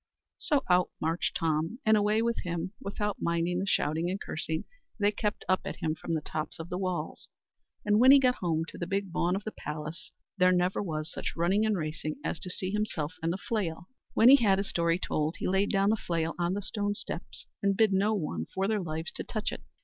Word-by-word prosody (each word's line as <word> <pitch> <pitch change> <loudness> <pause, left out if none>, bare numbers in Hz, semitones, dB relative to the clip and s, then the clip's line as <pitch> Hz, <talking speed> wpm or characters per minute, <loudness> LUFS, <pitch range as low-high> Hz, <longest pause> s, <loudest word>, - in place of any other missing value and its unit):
So 290 -3 +1
out 180 0 +4
marched 165 +2 -1
Tom, 160 +5 0
and 220 0 +6
away 210 +1 +3
with 235 0 0
him, 175 +2 -3
without 205 +1 -2
minding 170 +1 0
the 195 - -2
shouting 160 0 +1
and 190 +2 -2
cursing 160 0 -3 0.3
they 205 0 +3
kept 210 0 -2
up 185 - +3
at - - -4
him 155 - -1
from 165 +1 -3
the 155 - -1
tops 155 0 -4
of 165 +1 -7
the 180 - -2
walls; 185 -2 -3 0.6
and 210 0 +4
when 255 +2 +7
he 280 - +10
got 255 -2 +4
home 165 -3 0
to - - -10
the 170 - -3
big 195 0 -1
bawn 175 +1 +1
of 195 - -3
the 215 - -4
palace, 150 +1 -6 0.3
there 180 0 +6
never 180 +1 +2
was 155 -5 -3
such - - -4
running 190 +6 +2
and 215 -2 +1
racing 155 -1 -3
as - - -2
to 185 - -4
see 185 +1 -3
himself 190 -7 -2
and 165 +1 0
the 180 - -2
flail. 185 -6 -3 0.3
When 225 - +6
he 275 - +10
had 200 -7 +3
his 195 +1 -2
story 170 0 +2
told, 155 -3 -1
he - - -2
laid 190 +2 +2
down 195 +1 +3
the - - +3
flail 165 -4 -1
on 175 +2 +1
the 205 - -3
stone 205 0 -1
steps, 170 - -5 0.2
and 200 -1 +2
bid 220 -3 +4
no 205 +3 +3
one 85 - -3
for 195 +1 +1
their 215 -1 +1
lives 160 -1 -2
to - - -5
touch 215 -2 -2
it. - - -7
185 Hz, 230 wpm, -29 LUFS, 165-205 Hz, 0.6 s, he